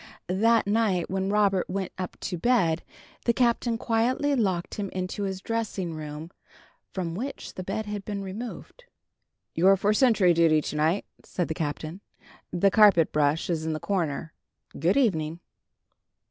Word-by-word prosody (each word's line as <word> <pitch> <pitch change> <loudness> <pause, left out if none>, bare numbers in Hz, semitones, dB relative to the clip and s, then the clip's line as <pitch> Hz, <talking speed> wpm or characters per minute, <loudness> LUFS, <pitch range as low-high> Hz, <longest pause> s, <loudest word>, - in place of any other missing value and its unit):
That 225 +5 +3
night, 200 -5 +1
when 190 0 -1
Robert 200 -3 +2
went 190 0 -3
up 185 -1 -6
to 185 - -3
bed, 175 -5 +2 0.4
the 235 - +3
Captain 235 -1 +1
quietly 245 +5 +1
locked 190 -8 0
him 200 -2 -3
into 185 +2 -3
his 190 -1 -4
dressing 210 -7 -2
room, 155 +1 -7 0.6
from 175 -3 -3
which 250 +10 -5
the 185 - -6
bed 195 +4 -3
had 210 -1 -5
been 200 -1 -4
removed. 230 - -8 0.7
"You're 190 +3 +5
for 205 +3 +2
sentry 215 -7 +4
duty, 165 -2 +4
to 150 - -5
night," 160 +6 +1 0.2
said 175 - -3
the - - 0
Captain. 155 +3 -4 0.5
"The 195 +3 +3
carpet 195 -6 +6
brush 150 +1 +1
is 165 -3 -1
in 160 0 -1
the 155 - -3
corner. 165 -5 -2 0.5
Good 170 - +2
evening." 165 - +1
190 Hz, 155 wpm, -26 LUFS, 165-215 Hz, 0.7 s, carpet